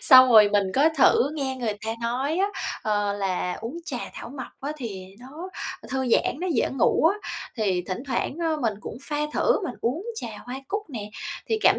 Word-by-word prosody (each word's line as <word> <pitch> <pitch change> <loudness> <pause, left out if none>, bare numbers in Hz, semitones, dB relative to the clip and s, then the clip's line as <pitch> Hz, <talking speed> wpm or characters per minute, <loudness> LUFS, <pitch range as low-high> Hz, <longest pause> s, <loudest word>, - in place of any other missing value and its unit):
Xong 255 -2 +9
rồi 210 -2 +9
mình 205 -1 +3
có 290 +4 +6
thử 270 +1 +5
nghe 265 -3 -2
người 235 -4 -1
ta 225 - 0
nói, 260 +7 0
á, 390 - +3 0.4
ờ, 205 -1 +1
là 190 -2 -1
uống 245 +9 -5
trà 255 -7 -3 0.2
thảo - - -7
mộc 265 0 -6
á 285 +2 -3
thì 200 -8 -6
nó 305 +9 -8 0.4
thư 265 -1 -1
giãn, 240 - +3
nó 370 - -1
dễ 245 - +2
ngủ 270 +3 +3 0.2
á, - - -7 0.3
thì 190 -5 +1
thỉnh 185 +5 -3
thoảng, 265 +2 -1
ơ, 325 -2 +1
mình 225 -5 +1
cũng - - -7
pha 295 +1 -3 0.2
thử, - - +3
mình - - -3
uống 290 - -1
trà 440 - -5 0.2
hoa 250 +1 -5
cúc 415 +1 -1
nè, 210 -4 -5 0.4
thì 445 - +2
cảm - - +6
255 Hz, 210 wpm, -25 LUFS, 215-290 Hz, 0.4 s, Xong